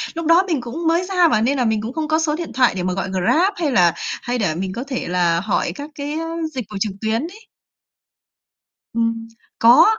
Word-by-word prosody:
lúc 335 -1 -4
đó 335 +4 +5
mình 310 -8 0
cũng 315 +8 -4
mới 335 +2 +3
ra 360 -2 +3
mà 215 -7 +2
nên 270 +4 +1
là 250 - +1
mình 220 -1 +1
cũng 230 +4 -5
không 310 -1 -2
có 315 +1 +2
số 305 -2 0
điện 340 0 -6
thoại 250 -5 +3
để 180 - -2
mà 185 - -1
gọi 195 +1 -3
Grab 310 - +2
hay 315 -5 -1
là 175 -7 +4 0.3
hay 245 +1 -2
để 185 -8 0
mình 185 +1 -3
có 240 +5 -4
thể 260 -3 -3
là 175 -1 +2
hỏi 205 +1 0
các 290 +1 -7
cái 290 +2 -4 0.4
dịch 250 -5 -4
vụ 205 - -4
trực 215 - 0
tuyến 220 +2 0
ấy. 410 +7 -9 1.5
Ừm, 230 0 -1 0.3
có. 235 +2 +7
245 Hz, 230 wpm, -20 LUFS, 210-320 Hz, 1.5 s, có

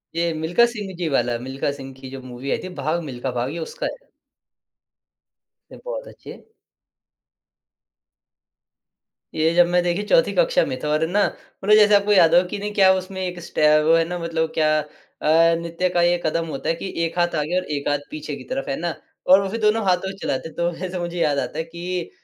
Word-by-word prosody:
ये 170 0 +1
मिल्खा 165 +9 +3
सिंह 210 -5 -5
जी 175 -2 -2
वाला, 120 -3 +1
मिल्खा 135 +3 -3
सिंह 135 -1 -9
की 130 -1 -9
जो 135 -1 -7
मूवी 130 +2 -6
आई - - +1
थी, 185 - -6
भाग 160 +4 0
मिल्खा 130 -2 -4
भाग, 125 +1 -2
ये 170 - -5
उसका 160 - -5
है। - - -7 1.6
ए - - -10
बहुत - - -5
अच्छे। - - -12 2.9
ये 160 +1 +2
जब 175 -1 +6
मैं 180 0 +2
देखिए 175 +4 0
चौथी - - +4
कक्षा - - +3
में - - -4
था - - -1
और 155 +1 +1
है 160 - +1
ना 205 +1 +3 0.4
मतलब 210 +2 +6
जैसे 210 -1 +6
आपको 200 +1 +2
याद 170 -4 +6
होगा 180 +1 +5
कि - - -4
नहीं 210 +1 -4
क्या 190 -2 +6
उसमें 190 0 -4
एक 180 -1 -5
स्टेप 155 -2 +3
वो 165 - +5
है 165 - +4
ना 175 0 -3
मतलब 165 -1 -1
क्या 155 -1 +2
अ, 165 +2 +1
नृत्य 170 +2 -2
का 175 -1 +1
ये 175 0 +3
कदम 165 +1 0
होता 145 0 -4
है 165 - +1
कि 190 - -6 0.2
एक 165 +2 -5
हाथ 175 0 +1
आगे 165 +5 -1
और 185 - -1
एक 140 - -4
हाथ 145 -1 +1
पीछे 150 -1 -5
की 130 - -10
तरफ 135 - -4
है 135 - 0
ना? 170 -1 -2 0.3
और 190 +2 +7
वो 195 - -3
फिर 230 - -4
दोनों 215 +1 +2
हाथों 190 +1 +1
से 195 - -12
चलाते, 160 -2 -3
तो 170 +2 -1
वैसे 180 +1 -5
मुझे 175 0 -4
याद 145 -3 +2
आता 135 +3 -4
है 160 - -1
कि 170 +1 -5
170 Hz, 220 wpm, -22 LUFS, 155-185 Hz, 2.9 s, और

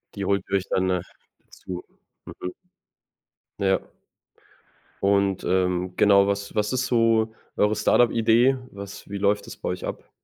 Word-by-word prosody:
Die 100 - -3
holt 100 0 +1
ihr 100 - +3
euch 95 - -5
dann 95 0 +1
nach 90 -1 0 0.5
zu. 90 -1 -8 0.4
Mhm. 90 - -7 1.1
Ja. 95 -1 +2 1.2
Und, 100 -1 +2
ähm, 90 0 0
genau, 100 -1 +5
was 100 0 -2
was 105 +1 0
ist 130 0 0
so 115 -2 +2 0.2
eure 105 +1 +2
Start-up-Idee? 120 +3 +3
Was 100 0 -9
wie 100 - -4
läuft 100 +1 +1
das - - -9
bei - - -4
euch - - -4
ab? - - -7
100 Hz, 145 wpm, -24 LUFS, 95-110 Hz, 1.2 s, genau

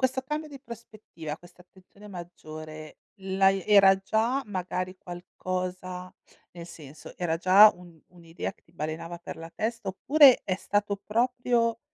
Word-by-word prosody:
Questo 260 0 +1
cambio 300 +3 -4
di 275 -2 -11
prospettiva, 215 - -9
questa 175 0 -19
attenzione 190 +3 -17
maggiore, 155 -4 -9 0.2
l'hai 195 0 +2
era 195 -2 +7
già, 225 +7 0
magari, 185 -1 -4
qualcosa 185 +1 -6 0.4
nel 170 -1 -9
senso, 150 -3 -12
era 165 -2 0
già 195 +5 +8
un 175 -2 -16
un'idea 170 -1 -7
che - - -34
ti 165 - -28
balenava 165 +2 -5
per 175 - -8
la 165 0 -9
testa, 225 -2 -3
oppure 270 +7 +6
è 185 - 0
stato 205 +1 -1
proprio 235 0 +1
185 Hz, 140 wpm, -27 LUFS, 175-220 Hz, 0.4 s, già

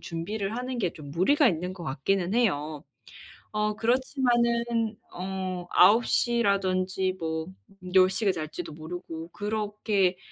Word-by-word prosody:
준비를 195 +6 -4
하는 250 0 -3
게 185 -7 0
좀 145 -2 -10
무리가 260 - +4
있는 180 0 -2
것 180 -2 -9
같기는 175 +7 -1
해요. 155 -10 0 0.7
어 210 0 0
그렇지만은 235 -2 +1 0.2
어 185 -1 -4
9 225 +3 +6
시라든지 190 -5 +1
뭐 160 0 -3 0.5
10 185 0 +7
시에 195 +1 +1
잘지도 160 0 -6
모르고. 165 +1 -7
그렇게 205 -3 0
190 Hz, 240 characters per minute, -27 LUFS, 175-225 Hz, 0.7 s, 10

